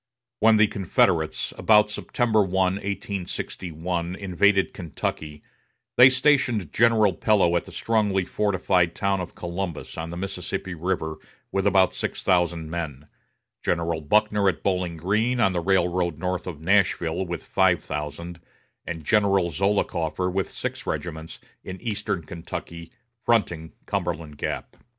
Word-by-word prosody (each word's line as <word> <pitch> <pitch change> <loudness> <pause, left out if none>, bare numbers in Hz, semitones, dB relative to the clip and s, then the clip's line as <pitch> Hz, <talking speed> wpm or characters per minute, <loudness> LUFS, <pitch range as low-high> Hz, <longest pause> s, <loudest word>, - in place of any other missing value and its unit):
When 110 0 +5
the 105 - +6
Confederates, 85 -5 +1
about 105 -1 +5
September 110 +1 +1
1, 95 -3 -1 0.3
1861, 90 -3 -4
invaded 95 +1 +2
Kentucky, 75 -3 -5 0.5
they 125 +2 +9
stationed 130 - +2
General 110 -4 +4
Pillow 90 -2 +3
at 85 - 0
the - - -11
strongly 105 -4 +1
fortified 95 -4 +1
town 100 -1 0
of 90 - -7
Columbus 85 -2 -5
on 80 +1 -4
the 85 - -6
Mississippi 95 0 -4
River, 80 -2 -2 0.3
with 95 +1 +1
about 95 -2 +4
six - - -4
thousand 85 -3 +1
men; 75 -4 -5 0.5
General 85 -1 0
Buckner 105 +4 +3
at - - -4
Bowling 90 -3 -1
Green, 110 +9 0
on 95 -5 +3
the 90 - 0
railroad 90 -3 +1
north 90 +2 -3
of 85 -5 -6
Nashville, 90 -1 +2
with 85 -1 -5
five 95 -2 +2
thousand; 75 +4 -5 0.5
and 80 -2 -5
General 100 -1 +2
Zollicoffer, 90 -1 0
with 95 0 -1
six - - -5
regiments, 80 -2 -5 0.2
in 95 0 -7
eastern 105 -6 -3
Kentucky, 85 0 -8 0.3
fronting 90 -9 0
Cumberland 85 -6 -3
Gap. - - -4
90 Hz, 130 wpm, -25 LUFS, 85-100 Hz, 0.5 s, they